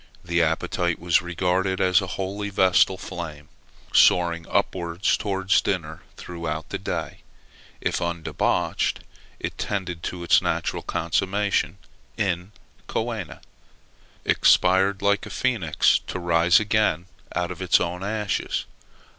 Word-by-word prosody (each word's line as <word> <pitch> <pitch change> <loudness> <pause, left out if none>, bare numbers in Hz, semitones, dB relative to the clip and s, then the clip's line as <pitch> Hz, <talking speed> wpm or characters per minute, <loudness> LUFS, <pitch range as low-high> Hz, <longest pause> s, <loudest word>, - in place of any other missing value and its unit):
The 85 -1 +1
appetite 85 +1 0
was 85 0 +2
regarded 90 +2 0
as 95 +1 +4
a 95 - -4
holy 100 +2 -3
vestal 95 -1 +3
flame, 80 -6 -7 0.4
soaring 85 -2 +4
upwards 85 +1 0
towards 95 -2 +1
dinner 80 -5 -3 0.2
throughout 80 -2 -5
the - - -4
day: - - -4 0.6
if - - -1
undebauched, 85 -1 -1 0.4
it - - -5
tended 90 -4 -3
to 90 0 -5
its 85 - +5
natural - - -1
consummation 100 +4 0 0.4
in 90 -1 -1 0.4
coena: 110 -6 -4 0.8
expired 95 +2 +3
like 100 -1 +2
a - - -8
phoenix, 100 -12 +2
to - - -4
rise 85 0 +4
again 105 -5 +1 0.3
out 90 0 -1
of 90 +1 -7
its 90 -1 +4
own 90 +2 -3
ashes. 105 0 -2
90 Hz, 120 wpm, -24 LUFS, 85-95 Hz, 0.8 s, its